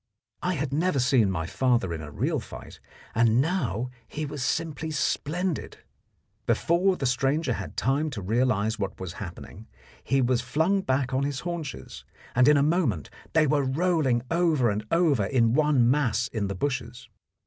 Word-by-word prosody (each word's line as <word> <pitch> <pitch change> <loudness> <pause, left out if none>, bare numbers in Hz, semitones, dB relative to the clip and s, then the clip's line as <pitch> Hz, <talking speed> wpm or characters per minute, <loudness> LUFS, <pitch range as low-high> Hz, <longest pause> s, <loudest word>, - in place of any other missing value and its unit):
I 180 0 0
had 140 -2 -3
never 165 +1 +1
seen 125 -4 +3
my 80 -4 -2
father 120 -3 +1
in 80 - -5
a 75 - -8
real - - -1
fight, - - -11 0.3
and 115 +1 +3
now 125 - -1 0.2
he 155 0 -4
was 145 -1 -6
simply 160 +2 -2
splendid. 160 +3 -2 0.7
Before 185 +3 +2
the 135 - -3
stranger 135 +3 +1
had - - -7
time 140 +4 +1
to - - -3
realize 110 0 +1
what 100 - -4
was 95 -2 -5
happening, 95 +3 -9 0.4
he 135 - +1
was 125 -1 +2
flung 160 +10 +1
back 130 -6 -1
on 130 - +1
his 140 -1 -2
haunches, 170 -6 -6 0.3
and 125 +2 +4
in 150 0 +6
a 140 - +3
moment 150 - 0 0.2
they 160 -1 +4
were 145 0 +2
rolling 135 -3 +1
over 160 -9 +2
and 105 +1 -2
over 160 - +3
in 115 -2 +2
one 145 -4 +3
mass 125 -3 +1
in 110 -5 -2
the 100 - -4
bushes. 125 0 -3
135 Hz, 170 wpm, -26 LUFS, 115-155 Hz, 0.7 s, in